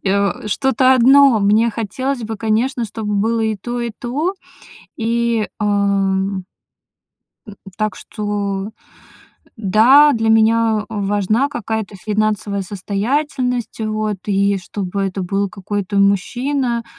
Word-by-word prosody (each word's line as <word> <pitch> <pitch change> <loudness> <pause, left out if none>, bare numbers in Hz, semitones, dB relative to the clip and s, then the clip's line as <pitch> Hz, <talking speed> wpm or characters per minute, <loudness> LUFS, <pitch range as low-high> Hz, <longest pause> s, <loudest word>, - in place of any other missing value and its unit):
и, - - -2
э, 200 0 0
что-то 260 +4 +3
одно. 265 0 +6
Мне 215 +3 +3
хотелось 245 +5 -3
бы, 220 0 -5
конечно, 230 +4 0
чтобы 210 -1 -4
было 225 +3 +1
и 220 -1 0
то, 240 +5 -5
и 235 - -2
то. 290 +9 -2 0.6
И, 230 -1 0
ам 195 -2 0 1.0
э, - - -8 0.3
так 215 -1 -1
что, 205 -1 -4 0.9
да, 235 +9 +5
для 225 -1 0
меня 225 -1 +3
важна 205 +4 0
какая-то 220 -6 -4
финансовая 210 0 -1
состоятельность, 245 +6 -2
вот, 215 -2 -2
и 200 0 +1
чтобы 195 +1 -4
это 195 0 -2
был 195 +2 -1
какой-то 200 +1 -3
мужчина 235 +5 0
215 Hz, 115 wpm, -18 LUFS, 200-235 Hz, 1.0 s, одно